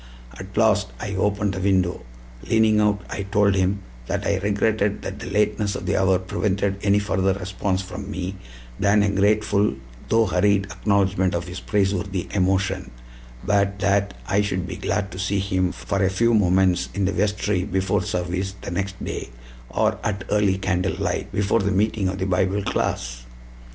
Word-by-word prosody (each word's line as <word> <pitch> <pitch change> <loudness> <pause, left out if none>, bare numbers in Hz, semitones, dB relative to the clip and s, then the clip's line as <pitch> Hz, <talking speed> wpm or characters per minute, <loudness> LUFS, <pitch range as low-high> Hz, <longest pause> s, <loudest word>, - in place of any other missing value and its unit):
At 95 +1 -9
last 105 -3 +3
I 100 -3 -4
opened 100 +1 0
the 95 - -4
window. 95 -3 +1 0.5
Leaning 110 -1 +4
out, 105 -1 +1
I - - -3
told 100 0 +2
him 95 +1 0 0.2
that - - -2
I 100 - +1
regretted 105 0 0
that - - -5
the - - -6
lateness 105 -1 +1
of 95 - -5
the 95 - 0
hour 95 -1 +3
prevented 100 +1 -1
any 100 0 +3
further 95 -2 +1
response 95 0 -2
from 95 - -7
me 95 +1 -4 0.4
than 100 +1 +4
a 100 - +2
grateful 100 -3 +2 0.3
though 115 +1 +4
hurried 100 +1 +2
acknowledgment 95 -3 +1
of 85 +1 -3
his 90 +1 -6
praiseworthy 95 -2 -1
emotion, 95 -1 0 0.5
but 100 -1 +1
that 100 +1 +1
I 100 0 +2
should 95 -3 -1
be 90 0 -6
glad 100 0 -2
to 95 - -7
see 100 +1 0
him 95 -2 0
for 100 -1 -3
a 95 - +3
few 115 +5 +2
moments 95 -3 +3
in 100 -1 +1
the 95 - +1
vestry 105 -1 0
before 95 +1 0
service 95 0 -2
the - - -6
next 95 +2 -3
day, - - -5 0.4
or - - +1
at 100 -2 -2
early 105 -2 +3
candlelight, 95 -1 -1
before 105 +3 +1
the 100 -1 0
meeting 100 0 +1
of 95 - -3
the 95 - -2
Bible 95 +2 +1
class. - - -2
100 Hz, 170 wpm, -23 LUFS, 95-105 Hz, 0.5 s, Leaning